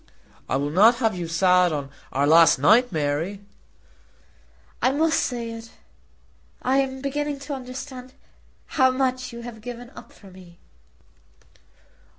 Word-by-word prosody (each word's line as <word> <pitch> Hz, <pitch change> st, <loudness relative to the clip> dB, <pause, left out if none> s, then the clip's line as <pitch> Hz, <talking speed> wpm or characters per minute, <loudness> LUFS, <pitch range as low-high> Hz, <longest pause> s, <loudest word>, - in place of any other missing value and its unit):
"I -, -, 0 dB
will 145 Hz, +2 st, -1 dB
not 215 Hz, +8 st, +6 dB
have 225 Hz, -4 st, 0 dB
you 175 Hz, -2 st, -4 dB
sad 180 Hz, +1 st, +3 dB
on 140 Hz, -2 st, -4 dB, 0.2 s
our 140 Hz, +2 st, +1 dB
last 165 Hz, +2 st, +6 dB
night, 220 Hz, -, +4 dB
Mary." 160 Hz, +5 st, -2 dB, 1.4 s
"I 255 Hz, -, +3 dB
must 320 Hz, +3 st, +1 dB
say 235 Hz, -2 st, -3 dB
it. 230 Hz, 0 st, -9 dB, 0.9 s
I 260 Hz, +2 st, +2 dB
am 265 Hz, -1 st, -1 dB
beginning 290 Hz, +1 st, -3 dB
to 285 Hz, +1 st, -6 dB
understand 255 Hz, 0 st, -8 dB, 0.5 s
how 260 Hz, -3 st, +2 dB
much 255 Hz, -1 st, -1 dB
you 235 Hz, 0 st, -9 dB
have 235 Hz, -2 st, -9 dB
given 245 Hz, +1 st, -9 dB
up -, -, -13 dB
for 195 Hz, -2 st, -17 dB
me." 180 Hz, -2 st, -16 dB
235 Hz, 140 wpm, -23 LUFS, 175-260 Hz, 1.4 s, not